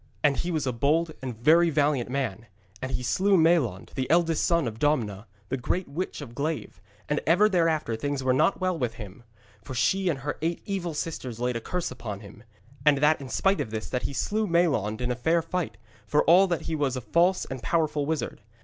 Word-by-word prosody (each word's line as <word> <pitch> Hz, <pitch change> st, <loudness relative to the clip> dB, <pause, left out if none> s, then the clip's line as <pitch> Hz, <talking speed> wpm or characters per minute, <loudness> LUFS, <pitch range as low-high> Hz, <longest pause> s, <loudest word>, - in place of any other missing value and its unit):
And 145 Hz, -2 st, +3 dB
he 175 Hz, -, -2 dB
was 155 Hz, -5 st, -1 dB
a 130 Hz, -, -1 dB
bold 155 Hz, +7 st, +1 dB
and 125 Hz, -4 st, -5 dB
very 165 Hz, +8 st, +5 dB
valiant 145 Hz, -5 st, +1 dB
man; 120 Hz, -5 st, -3 dB, 0.3 s
and 130 Hz, 0 st, -4 dB
he 125 Hz, -, -2 dB
slew 195 Hz, +10 st, +3 dB
Maelond, 160 Hz, -, +2 dB
the 130 Hz, -2 st, -3 dB
eldest 165 Hz, -1 st, +3 dB
son 170 Hz, -6 st, +2 dB
of 110 Hz, -1 st, -6 dB
Domna, 115 Hz, -8 st, 0 dB, 0.2 s
the 130 Hz, -, -1 dB
great 175 Hz, +9 st, -2 dB
witch 160 Hz, +3 st, -4 dB
of 125 Hz, -5 st, -9 dB
Glaive, 150 Hz, +4 st, -4 dB, 0.3 s
and 150 Hz, -, 0 dB
ever 180 Hz, +6 st, +5 dB
thereafter 165 Hz, -, +1 dB
things 140 Hz, +3 st, -3 dB
were 130 Hz, -1 st, +3 dB
not 165 Hz, +9 st, +2 dB
well 185 Hz, -1 st, 0 dB
with 125 Hz, -7 st, -2 dB
him. 105 Hz, -1 st, -10 dB, 0.4 s
For 130 Hz, -, -7 dB
she 190 Hz, +9 st, +2 dB
and 155 Hz, -, 0 dB
her 145 Hz, +1 st, -4 dB
eight 165 Hz, +1 st, -2 dB
evil 180 Hz, -5 st, -3 dB
sisters 130 Hz, -7 st, -4 dB
laid 125 Hz, 0 st, -1 dB
a 115 Hz, -, -3 dB
curse 180 Hz, +5 st, -3 dB
upon 105 Hz, -6 st, -6 dB
him. 110 Hz, +2 st, -13 dB, 0.4 s
And 150 Hz, -2 st, +5 dB
that 150 Hz, +1 st, +3 dB
in 135 Hz, -, -8 dB
spite 195 Hz, +1 st, +1 dB
of 130 Hz, -, -4 dB
this, 110 Hz, 0 st, -5 dB
that 125 Hz, -, -1 dB
he -, -, -3 dB
slew 215 Hz, +9 st, -1 dB
Maelond 140 Hz, -, +1 dB
in 125 Hz, 0 st, 0 dB
fair 160 Hz, +7 st, +1 dB
fight, 165 Hz, -, -3 dB, 0.3 s
for 150 Hz, -, +3 dB
all 180 Hz, +4 st, +6 dB
that 170 Hz, -3 st, -1 dB
he 165 Hz, -, -4 dB
was 140 Hz, -4 st, 0 dB
a -, -, -4 dB
false 175 Hz, +8 st, +2 dB
and 130 Hz, -2 st, -6 dB
powerful 155 Hz, -2 st, 0 dB
wizard. 160 Hz, -6 st, -3 dB
145 Hz, 215 wpm, -27 LUFS, 125-170 Hz, 0.4 s, all